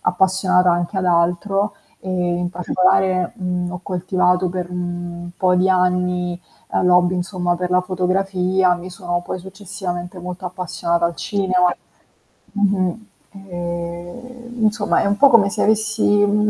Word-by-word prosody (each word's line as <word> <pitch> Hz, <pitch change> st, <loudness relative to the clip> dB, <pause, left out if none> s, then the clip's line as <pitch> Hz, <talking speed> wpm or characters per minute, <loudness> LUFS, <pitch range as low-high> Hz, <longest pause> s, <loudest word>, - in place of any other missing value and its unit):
appassionata 185 Hz, 0 st, +3 dB
anche 175 Hz, +3 st, -1 dB
ad 190 Hz, -, 0 dB
altro, 180 Hz, +4 st, +1 dB, 0.3 s
ehm, 180 Hz, -2 st, -1 dB
in 175 Hz, 0 st, -1 dB
particolare, 185 Hz, 0 st, +1 dB
mhmm, 180 Hz, -2 st, -3 dB
ho 180 Hz, -, -6 dB
coltivato 180 Hz, 0 st, +1 dB
per 180 Hz, 0 st, -4 dB
un 175 Hz, -1 st, -5 dB
po' 185 Hz, -1 st, +2 dB
di 185 Hz, +1 st, +3 dB
anni, 180 Hz, -1 st, +1 dB, 0.3 s
ehm, -, -, +1 dB
l'hobby, 180 Hz, 0 st, +4 dB
insomma, 180 Hz, -1 st, -1 dB
per 180 Hz, 0 st, -3 dB
la 180 Hz, -, +4 dB
fotografia, 185 Hz, 0 st, +1 dB
mi 175 Hz, +1 st, -8 dB
sono 175 Hz, -1 st, -3 dB
poi -, -, -4 dB
successivamente 185 Hz, -2 st, -6 dB
molto 180 Hz, +1 st, -7 dB
appassionata 175 Hz, -1 st, -2 dB
al 170 Hz, -, -5 dB
cinema 185 Hz, -3 st, +1 dB, 0.8 s
mh-mh. 200 Hz, 0 st, 0 dB, 0.3 s
Ehm, 190 Hz, +6 st, -7 dB
insomma, 215 Hz, -1 st, +2 dB
è -, -, 0 dB
un 200 Hz, 0 st, +2 dB
po' 280 Hz, -1 st, +7 dB
come 215 Hz, -5 st, +5 dB
se -, -, -3 dB
avessi, 220 Hz, 0 st, +1 dB
uhm, 205 Hz, +1 st, +3 dB
180 Hz, 140 wpm, -20 LUFS, 175-195 Hz, 0.8 s, po